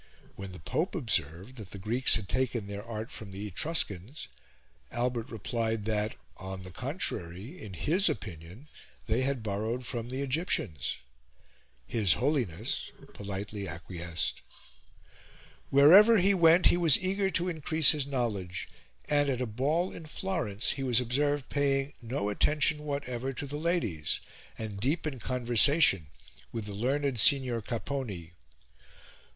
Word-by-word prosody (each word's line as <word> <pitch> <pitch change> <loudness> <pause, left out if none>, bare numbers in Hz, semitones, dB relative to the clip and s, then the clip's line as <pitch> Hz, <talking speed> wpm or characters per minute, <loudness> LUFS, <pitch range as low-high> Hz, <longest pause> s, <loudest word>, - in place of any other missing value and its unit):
When 95 -1 -7
the 90 - -9
Pope 170 - -2
observed 100 - -2
that 105 -5 -9
the - - -8
Greeks 115 +6 +3
had 105 -3 -3
taken 125 -3 0
their 100 0 -6
art 110 -1 -6
from 105 - -9
the 100 +2 -6
Etruscans, 105 - -2 0.6
Albert 120 -1 -2
replied 115 -1 -2
that, 105 -1 -1 0.2
on 95 0 -7
the 90 - -10
contrary, 115 - -4
in 100 -4 -8
his 175 - +3
opinion, 90 - -7 0.4
they 115 +3 +1
had 130 -3 -1
borrowed 110 +4 -3
from 120 0 -4
the 130 +2 -3
Egyptians: 135 - -1 0.9
his 100 - +3
Holiness 120 - -1 0.2
politely 100 0 -5
acquiesced. 85 0 -3 1.3
Wherever 190 +12 +8
he 195 +1 +4
went 170 -1 +5
he - - +5
was 165 -5 +6
eager 190 +1 0
to 180 -1 +1
increase 160 -2 +5
his 145 -3 -1
knowledge, 105 -10 -3 0.4
and, 145 -1 +2
at 130 -3 -1
a 125 - -1
ball 145 - -1
in 160 - -9
Florence, 150 - -1
he 135 - -4
was 125 -3 +3
observed 140 +3 0
paying 140 0 0
no 115 -3 -2
attention 150 +7 +2
whatever 135 -3 -3
to 145 - -5
the 145 +1 -5
ladies, 155 - -1 0.4
and 105 -3 -6
deep 145 +10 0
in 140 -5 -4
conversation 120 - +4 0.4
with 115 -2 -5
the 105 - -6
learned 130 +4 -1
Signor 125 -2 +5
Capponi. 110 -7 -5
120 Hz, 140 wpm, -29 LUFS, 100-145 Hz, 1.3 s, Wherever